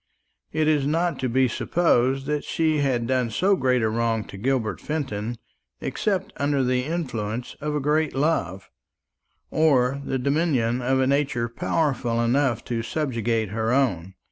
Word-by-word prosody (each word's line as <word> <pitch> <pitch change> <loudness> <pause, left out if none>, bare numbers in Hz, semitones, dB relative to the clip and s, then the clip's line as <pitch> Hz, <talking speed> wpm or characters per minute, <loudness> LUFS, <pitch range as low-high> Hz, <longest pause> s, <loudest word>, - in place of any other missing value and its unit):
It 155 0 +1
is 150 -3 +2
not 165 +3 0
to 130 - -1
be 130 +2 +3
supposed 135 -1 +1
that 150 0 -1
she 160 -2 +1
had 130 -4 +1
done 130 -1 +1
so 190 - +2
great 125 -7 +1
a - - +3
wrong 115 0 0
to - - -9
Gilbert 125 +1 -1
Fenton 120 -7 -3 0.4
except 195 -4 -2
under 140 -1 +1
the 125 0 +1
influence 125 -8 -3
of 150 0 -2
a - - +1
great 150 +2 +1
love, 115 - -1 0.8
or 140 -4 +3
the 135 - -2
dominion 130 -4 +1
of 130 +2 +1
a 130 - +3
nature 135 -3 +1
powerful 120 -1 -1
enough 120 +1 +1
to 115 -2 -2
subjugate 115 -5 -1
her 110 +2 -1
own. 95 -9 0
130 Hz, 155 wpm, -24 LUFS, 115-150 Hz, 0.8 s, be